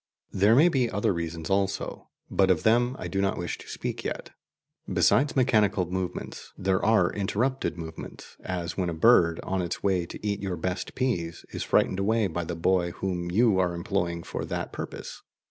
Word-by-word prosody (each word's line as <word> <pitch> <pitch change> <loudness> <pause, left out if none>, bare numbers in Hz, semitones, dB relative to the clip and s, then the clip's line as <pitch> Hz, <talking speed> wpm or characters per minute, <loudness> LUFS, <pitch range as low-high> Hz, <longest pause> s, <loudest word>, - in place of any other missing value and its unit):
There 100 +4 +4
may 155 +7 +7
be 130 -8 +2
other 100 -1 +1
reasons 85 +1 -4
also, 95 0 -1 0.2
but 95 -1 +2
of 90 -4 +2
them 120 +3 +3
I - - -5
do 95 - -1
not 100 -1 0
wish - - -4
to - - -12
speak - - -4
yet. - - -5 0.6
Besides 140 +2 +3
mechanical 105 -7 +3
movements, 90 +1 -5
there 95 0 0
are 110 -5 +3
interrupted 110 +5 -1
movements, 80 -1 -9
as 90 -2 -3
when 90 -2 -1
a 85 - -3
bird, 85 -4 +5
on 95 0 -1
its 85 -1 -4
way 95 -3 +1
to - - -9
eat 100 -1 -1
your 95 -3 -3
best 90 +3 -3
peas, 90 -11 -2
is - - -5
frightened 95 - +2
away 110 +2 +2
by 85 -2 -2
the 85 - -4
boy 85 +1 +2
whom 90 -2 -3
you 105 +1 +3
are 90 -2 +1
employing 85 -1 -2
for - - -5
that - - -4
purpose. - - -7
95 Hz, 185 wpm, -27 LUFS, 85-105 Hz, 0.6 s, may